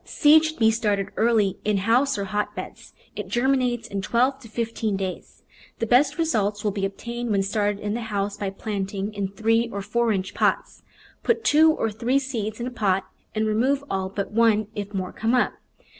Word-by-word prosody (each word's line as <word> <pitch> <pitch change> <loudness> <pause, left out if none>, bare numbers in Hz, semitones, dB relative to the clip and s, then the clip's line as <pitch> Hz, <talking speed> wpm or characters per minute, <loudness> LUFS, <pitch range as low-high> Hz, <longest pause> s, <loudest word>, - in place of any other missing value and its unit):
Seed 310 0 +5
should 315 0 -3
be 225 -1 +4
started 205 -3 0
early 220 -4 +2
in 210 -1 +1
house 240 +7 +2
or 200 - -2
hot 210 +1 -2
beds. - - -9 0.2
It - - -5
germinates 245 -2 +1
in 200 -3 -3
twelve 255 +6 +1
to 250 - -13
fifteen 225 -2 -2
days. 190 -1 -6 0.3
The 230 - -1
best 270 +5 +3
results 210 -11 0
will 210 - +1
be 195 0 -2
obtained 235 +4 -6
when 200 -2 +2
started 205 0 0
in 205 0 -3
the 240 - -3
house 205 -2 -2
by 205 -1 -3
planting 200 0 -4
in 200 -1 -2
three 225 +4 +1
or 200 -1 -4
four 235 +2 +1
inch 190 -1 -2
pots. - - 0 0.4
Put 460 -1 +1
two 315 -2 +6
or 225 -7 -1
three 235 +5 0
seeds 230 -6 -3
in 240 - -3
a 250 - -4
pot 195 -5 +1 0.3
and 215 0 +1
remove 255 +6 +1
all 190 -1 -1
but 200 +1 -4
one 215 -1 +3
if 205 -1 -5
more 190 -2 -4
come 225 +3 0
up. 250 - +2
220 Hz, 200 wpm, -24 LUFS, 200-240 Hz, 0.4 s, two